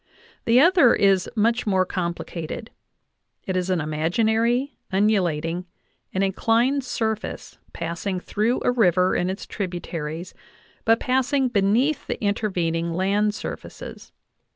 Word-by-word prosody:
The 235 +2 +5
other 335 -5 +6
is 195 -2 +3
much 230 +2 +1
more 190 -2 +3
complicated; 175 +3 -4 0.7
it 190 - -2
is 185 0 -1
an 185 -2 +1
imaginary, 220 - +1 0.2
undu 205 +1 +3
lating, 165 +1 -2 0.5
and 190 - 0
inclined 230 +8 +2
surface 220 -3 -3
passing 170 +3 -3
through 220 +6 0
a - - +3
river 185 -6 +3
and 180 - 0
its 190 +2 -5
tributaries, 175 -3 -5 0.5
but 225 +1 +4
passing 260 +1 +1
beneath 240 +7 +1
the - - -3
intervening 175 -6 -1
land 205 +3 +1
surfaces. - - -8
200 Hz, 120 wpm, -24 LUFS, 180-230 Hz, 0.7 s, other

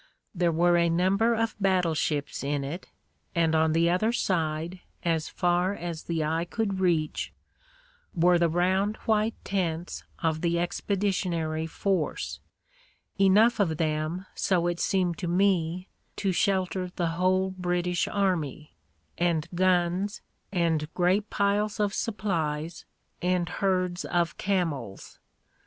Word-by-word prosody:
There 175 -3 +2
were 175 +2 +3
a 170 0 +3
number 195 +7 +2
of 225 0 -1
battleships 165 -8 0
in 140 0 -1
it, 155 +7 -6 0.5
and 165 -1 +2
on 160 0 +3
the 165 +1 +3
other 215 +6 +2
side, 170 -5 -1 0.2
as 165 -2 0
far 180 +2 +1
as 170 -3 -6
the 165 -2 -1
eye 160 +2 0
could 200 0 -2
reach, 165 -5 0 0.8
were 175 +1 +4
the 170 -1 +3
round 190 +5 +1
white 220 0 +2
tents 175 -3 -2
of 160 -3 -1
the 170 -1 +1
expeditionary 175 -3 -1
force 185 -1 -2 0.4
— - - -35
enough 220 +5 +5
of 165 -6 +1
them, 155 +3 -1
so 180 -3 +1
it 175 0 -1
seemed 180 -3 0
to 180 - -3
me, 180 -1 +1 0.3
to 195 -2 0
shelter 185 0 0
the 170 -2 0
whole 185 +3 +1
British 180 -1 -1
army 165 -7 -1 0.2
— 80 -1 -42
and 170 -3 +1
guns, 185 +2 +1 0.3
and 165 -4 0
great 190 +4 +2
piles 205 +1 0
of 205 -1 +1
supplies, 165 -8 -2 0.4
and 180 -1 +1
herds 185 -1 0
of 170 -2 0
camels. 160 - -2
175 Hz, 130 wpm, -27 LUFS, 165-190 Hz, 0.8 s, enough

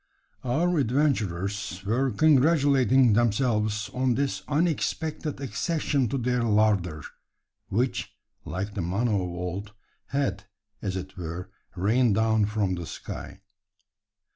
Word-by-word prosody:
Our 160 +7 +1
adventurers 100 - 0
were 125 +6 +1
congratulating 135 -2 +4
themselves 110 -2 +1
on 125 -1 +1
this 120 -8 -1
unexpected 155 -1 -1
accession 140 -2 -1
to 135 - -1
their 125 0 0
larder; 105 -8 +2 0.7
which, 120 +6 -1 0.3
like 95 +6 -4
the 100 - -3
manna 100 +7 0
of 100 - +2
old, 90 +4 -5 0.3
had, 105 -8 -1 0.4
as 95 -2 -2
it 95 0 -6
were, 90 +2 -6 0.2
rained 110 +4 +2
down 110 -1 +3
from 105 -3 0
the 85 -2 -5
sky. - - -8
110 Hz, 115 wpm, -26 LUFS, 95-135 Hz, 0.7 s, congratulating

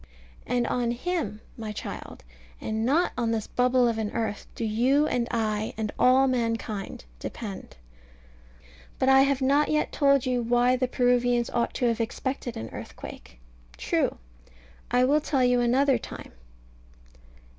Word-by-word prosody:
And 245 -1 +1
on 240 -1 0
Him, 240 - -3
my 220 -2 -6
child, 210 - -7 0.4
and 220 0 -2
not 295 +9 +2
on 235 -2 0
this 225 -2 -1
bubble 250 0 +2
of 230 -1 -1
an 215 -1 -1
earth, 215 -3 -3
do 230 - -3
you 250 +7 +2
and 245 -5 0
I, 215 -2 -1
and 215 -1 -2
all 255 +2 +5
mankind, 230 - -2
depend. 200 - -7 1.2
But 260 - +2
I 265 0 +7
have 275 -1 +2
not 285 +3 +3
yet 305 0 +1
told 275 -3 +3
you 250 -1 0
why 245 +2 +3
the 255 0 0
Peruvians 245 -1 +2
ought 235 -1 -1
to 250 - 0
have 235 -1 +1
expected 245 +2 -3
an 110 0 -6
earthquake. 60 -1 -10 0.4
True. - - 0 0.7
I 250 +1 +3
will 290 +4 +3
tell 275 -3 +1
you 250 0 +3
another 255 +2 +3
time. - - -9
245 Hz, 150 wpm, -26 LUFS, 225-260 Hz, 1.2 s, I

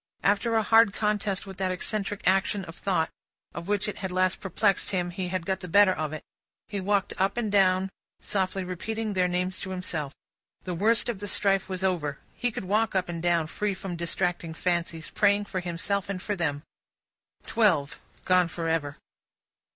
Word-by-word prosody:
After 205 +3 +2
a 220 - +3
hard 225 -1 +6
contest 210 -2 0
with 190 -2 -9
that 190 -1 0
eccentric 200 +2 -2
action 195 +1 +2
of 165 - -10
thought 180 -5 0 0.4
which 200 +4 -1
had 195 -3 -3
last 185 0 +2
perplexed 195 +1 +1
him, 175 -2 -1
he 185 0 -3
had 180 -1 -2
got 190 0 -1
the 185 - -7
better 195 +2 +6
of 155 -3 -3
it. 155 - -6 0.4
He 200 -2 -3
walked 200 +1 +1
up 195 +4 +1
and 220 -4 -1
down, 190 -1 +3 0.3
softly 190 -1 -1
repeating 215 +4 -3
their 185 -1 +2
names 180 +1 -1
to 190 - -5
himself. 170 -6 -3 0.5
The 180 - -3
worst 215 +6 +3
of 235 -5 -2
the 205 - -4
strife 195 -1 +2
was 185 0 -3
over. 160 -7 0 0.2
He 245 - -1
could 215 - -5
walk 215 +3 +1
up 185 -2 +1
and 170 -1 -4
down, 170 -2 +2
free 200 +5 -2
from 185 -2 -5
distracting 170 -1 -1
fancies, 170 -2 -1
praying 205 -1 +3
for 195 -2 -3
himself 180 +3 -2
and 195 -2 -2
for 205 +3 -2
them. 145 -5 -1 0.8
Twelve 180 -11 +2 0.3
gone 185 -1 +4
for 165 0 -4
ever. 150 -3 -1
190 Hz, 180 wpm, -27 LUFS, 175-205 Hz, 0.8 s, hard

